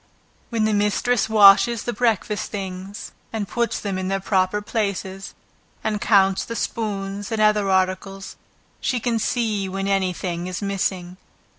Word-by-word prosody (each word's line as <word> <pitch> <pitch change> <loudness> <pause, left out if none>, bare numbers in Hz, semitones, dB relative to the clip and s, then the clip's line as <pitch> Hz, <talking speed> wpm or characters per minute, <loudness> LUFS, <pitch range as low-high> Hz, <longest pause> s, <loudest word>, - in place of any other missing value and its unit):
Where 230 - -3
the 215 0 +2
mistress 210 +3 +1
washes 215 +2 +6
the 240 - -2
breakfast 215 -2 0
things, 195 0 -6 0.2
and 215 -3 -3
puts 235 +2 -1
them 195 -2 -3
in 185 - -3
their 195 +1 0
proper 190 0 +1
places, 200 -3 -3 0.5
and 210 -2 -1
counts 195 -3 +3
the 230 - -6
spoons, 205 -2 -3
and 220 - -1
other 210 -2 +3
articles, 190 +1 -1 0.4
she 250 - 0
can 230 0 0
see 215 -4 -1
when 195 +1 -3
any 195 -2 +1
thing 175 0 -4
is 185 -1 -4
missing. 190 -3 -2
200 Hz, 150 wpm, -22 LUFS, 190-220 Hz, 0.5 s, washes